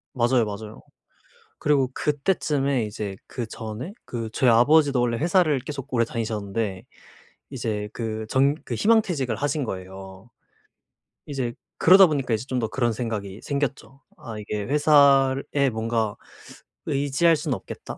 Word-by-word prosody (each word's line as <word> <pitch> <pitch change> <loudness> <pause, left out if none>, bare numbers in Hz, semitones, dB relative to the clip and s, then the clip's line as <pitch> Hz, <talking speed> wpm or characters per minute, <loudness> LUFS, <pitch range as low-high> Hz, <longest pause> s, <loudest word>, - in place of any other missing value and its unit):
맞아요, 120 -1 +3
맞아요. 105 +1 -7 0.8
그리고 140 -3 +2
그때쯤에 140 - 0
이제 105 -2 -5
그전에 115 - -6
그 115 -2 -5
저희 125 -3 +3
아버지도 140 +3 +4
원래 120 -1 +1
회사를 165 -3 +2
계속 135 -1 -7
오래 115 -1 +3
다니셨는데 110 -3 -3 0.7
이제 110 -5 -3
그 110 -2 -4
정 135 +3 +3
그 - - -4
희망퇴직을 175 - +2
하신 145 0 -1
거예요. 95 +1 -8 1.0
이제 130 -4 -3 0.2
그러다 190 +2 +8
보니까 135 -7 -1
이제 110 +3 -2
좀 130 -2 -2
더 110 -2 -1
그런 120 -1 0
생각이 110 -4 -4
생겼죠. 140 -1 -3 0.2
'아 110 -3 -8
이게 105 0 -4
회사에 140 -1 +4
뭔가 110 -1 -1 0.7
의지할 145 +4 +2
수는 150 -3 -2
없겠다.' - - -10
125 Hz, 300 characters per minute, -24 LUFS, 110-145 Hz, 1.0 s, 그러다